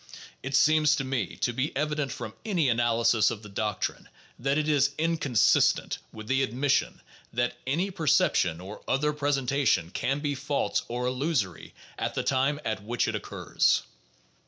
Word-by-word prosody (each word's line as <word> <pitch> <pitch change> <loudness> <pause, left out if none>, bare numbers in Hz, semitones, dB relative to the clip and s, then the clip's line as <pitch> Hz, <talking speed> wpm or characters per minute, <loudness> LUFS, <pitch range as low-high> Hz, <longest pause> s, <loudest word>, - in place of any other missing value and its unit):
It 135 +1 -3
seems 150 +1 +5
to 135 - -2
me 130 -9 -2
to 120 - +1
be 130 +3 -2
evident 150 -2 -1
from 120 -4 -6
any 175 -10 +1
analysis 115 -2 +3
of 110 -1 -6
the 105 - -10
doctrine 105 0 -3 0.3
that 135 +3 +1
it 155 0 0
is 140 -2 +2
inconsistent 155 -7 +2
with 110 0 -9
the 135 +2 +2
admission 135 +2 0 0.3
that 120 +1 -1
any 175 +9 0
perception 145 - +2
or 95 +4 -9
other 150 +3 +1
presentation 140 - +1
can 135 +7 -1
be 145 -1 -1
false 140 +1 -1
or 120 +1 -3
illusory 125 - -2 0.2
at - - -2
the - - -1
time 140 +2 +1
at 110 -3 -2
which 115 +3 -1
it - - -1
occurs. - - 0
135 Hz, 160 wpm, -27 LUFS, 115-145 Hz, 0.3 s, seems